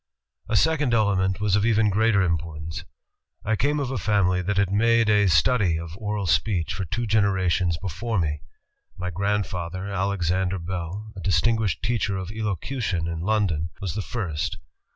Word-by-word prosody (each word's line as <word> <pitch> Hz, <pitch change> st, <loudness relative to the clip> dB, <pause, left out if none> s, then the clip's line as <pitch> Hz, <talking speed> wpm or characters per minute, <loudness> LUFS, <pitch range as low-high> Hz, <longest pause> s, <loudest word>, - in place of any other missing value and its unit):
"A 110 Hz, -, +1 dB
second 140 Hz, -, +3 dB
element 95 Hz, -3 st, +2 dB
was 105 Hz, -2 st, +2 dB
of 105 Hz, -, +2 dB
even 110 Hz, -2 st, +3 dB
greater 105 Hz, -1 st, +3 dB
importance. 80 Hz, -2 st, -3 dB, 0.6 s
I 110 Hz, +1 st, +2 dB
came 145 Hz, +7 st, +1 dB
of 135 Hz, -3 st, -2 dB
a 130 Hz, -, -2 dB
family 95 Hz, -4 st, +2 dB
that 95 Hz, +2 st, -1 dB
had 100 Hz, -2 st, +2 dB
made 115 Hz, +2 st, +3 dB
a... 105 Hz, -1 st, +4 dB
study 95 Hz, -2 st, +3 dB
of 85 Hz, 0 st, -7 dB
oral 105 Hz, 0 st, -3 dB
speech 90 Hz, -1 st, +1 dB
for 95 Hz, -, -3 dB
two 120 Hz, +8 st, -2 dB
generations 95 Hz, -5 st, +2 dB
before 100 Hz, +6 st, -3 dB
me. 75 Hz, -4 st, -1 dB, 0.6 s
My 90 Hz, 0 st, -3 dB
grandfather, 95 Hz, -1 st, -2 dB
Alexander 95 Hz, -1 st, 0 dB
Bell, 90 Hz, +4 st, -5 dB
a -, -, -7 dB
distinguished 95 Hz, +3 st, +1 dB
teacher 110 Hz, -4 st, 0 dB
of 95 Hz, 0 st, -5 dB
elocution 105 Hz, -, -2 dB
in 85 Hz, -1 st, -3 dB
London, 90 Hz, -4 st, 0 dB
was 95 Hz, -5 st, -3 dB
the 105 Hz, -, -2 dB
first. 90 Hz, -9 st, -3 dB
100 Hz, 160 wpm, -24 LUFS, 90-110 Hz, 0.6 s, a